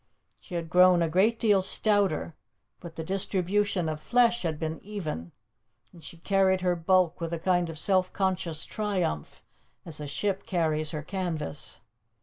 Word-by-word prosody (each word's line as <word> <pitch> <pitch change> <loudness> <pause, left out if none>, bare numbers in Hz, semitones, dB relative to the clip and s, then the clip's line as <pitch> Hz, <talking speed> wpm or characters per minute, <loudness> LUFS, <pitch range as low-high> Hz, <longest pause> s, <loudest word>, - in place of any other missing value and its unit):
She 180 - -9
had 170 -1 -3
grown 180 -1 +6
a - - +1
great 200 +7 +2
deal 205 -4 +3
stouter, 195 -4 +2 0.5
but 170 -2 -10
the 160 - -5
distribution 195 0 0
of 155 -1 -3
flesh 240 +2 +3
had 160 -3 -2
been 160 0 -4
even, 155 - -5 0.6
and 170 -3 -15
she 170 - -9
carried 190 +1 +2
her 180 -1 +1
bulk 175 0 +2
with 165 0 -3
a - - -1
kind 175 0 +1
of 160 - -7
self 185 +2 +2
conscious 185 -5 -1
triumph, 190 - -3 0.4
as 160 -3 -5
a 150 - -5
ship 195 +7 -2
carries 155 -4 0
her 150 -1 -4
canvas. 155 - -3
180 Hz, 160 wpm, -27 LUFS, 160-195 Hz, 0.6 s, grown